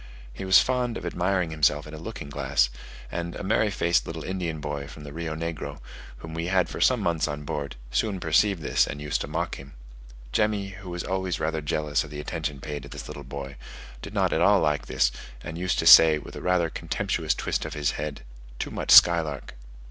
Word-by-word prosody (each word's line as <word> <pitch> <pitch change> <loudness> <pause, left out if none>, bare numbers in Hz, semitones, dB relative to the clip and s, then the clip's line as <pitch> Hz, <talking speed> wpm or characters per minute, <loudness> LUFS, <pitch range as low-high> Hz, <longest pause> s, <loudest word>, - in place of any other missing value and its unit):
He 95 - -6
was 95 0 +7
fond 125 -2 +1
of - - -7
admiring 90 0 0
himself 75 -1 +2
in 75 - -10
a 75 - -7
looking 70 -3 -7
glass; 65 -3 +1 0.4
and 85 0 -4
a - - -6
merry 110 +2 +2
faced 85 -3 +1
little 80 -1 -5
Indian 90 -4 -3
boy 70 -1 -4
from 75 +1 -11
the 70 -1 -9
Rio 80 -1 -4
Negro, 80 -3 -5 0.4
whom 80 0 -9
we 85 +1 -3
had 90 -1 +2
for - - -6
some 125 -3 +4
months 85 -5 0
on 75 0 -5
board, 70 -1 -4 0.2
soon 100 - 0
perceived 85 +2 +2
this, - - +2
and 70 - -6
used 75 -1 -2
to - - -4
mock - - -3
him: 70 0 -12 0.6
Jemmy, 105 -2 +1
who 100 -1 -10
was 90 -1 -4
always 95 -2 -2
rather 80 0 -1
jealous 75 0 0
of 75 - -10
the 75 0 -7
attention 75 -2 -4
paid 75 0 -5
to 70 - -11
this - - -8
little 70 - -8
boy, 70 +1 -7 0.4
did - - -8
not - - +2
at - - +1
all - - +5
like 75 -1 0
this, - - +2 0.3
and 80 - -6
used 90 +1 -1
to - - 0
say, 80 -1 +9
with 75 - -10
rather 90 -2 +1
a 80 - -4
contemptuous - - -1
twist - - -2
of - - -6
his 75 -2 0
head, 75 -1 -5 0.4
"Too - - -4
much - - -5
skylark." 80 -5 +6
80 Hz, 215 wpm, -26 LUFS, 75-90 Hz, 0.6 s, say